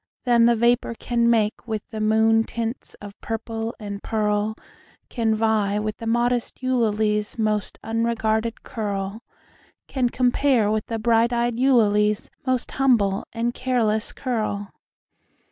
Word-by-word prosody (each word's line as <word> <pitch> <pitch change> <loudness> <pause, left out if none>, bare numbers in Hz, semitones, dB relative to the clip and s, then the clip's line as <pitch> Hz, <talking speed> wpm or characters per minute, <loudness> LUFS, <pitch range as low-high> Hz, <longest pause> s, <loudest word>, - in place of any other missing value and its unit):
That 240 -2 +4
the 235 - +4
vapor 235 0 +2
can 235 0 +1
make 220 0 +1
With 220 -2 -4
the 220 -1 -4
moon 220 +1 +4
tints 230 +2 -5
of 205 -1 -12
purple 225 0 -4
and 205 -2 -6
pearl, 210 -1 0 0.5
Can 225 -3 0
vie 215 -2 +1
with 215 0 -3
the 230 - -6
modest 240 +2 0
Eulalie's 215 -4 0
most 215 -2 -1
unregarded 225 0 -1
curl 200 -1 -4 0.7
Can 255 -3 0
compare 250 -3 +2
with 215 0 -1
the 225 - -2
bright 230 +1 +2
eyed 240 0 0
Eulalie's 210 -5 +3 0.2
most 255 -1 0
humble 225 -8 +2
and 235 +1 -1
careless 230 -5 0
curl. 215 -5 -3
225 Hz, 130 wpm, -23 LUFS, 215-235 Hz, 0.7 s, That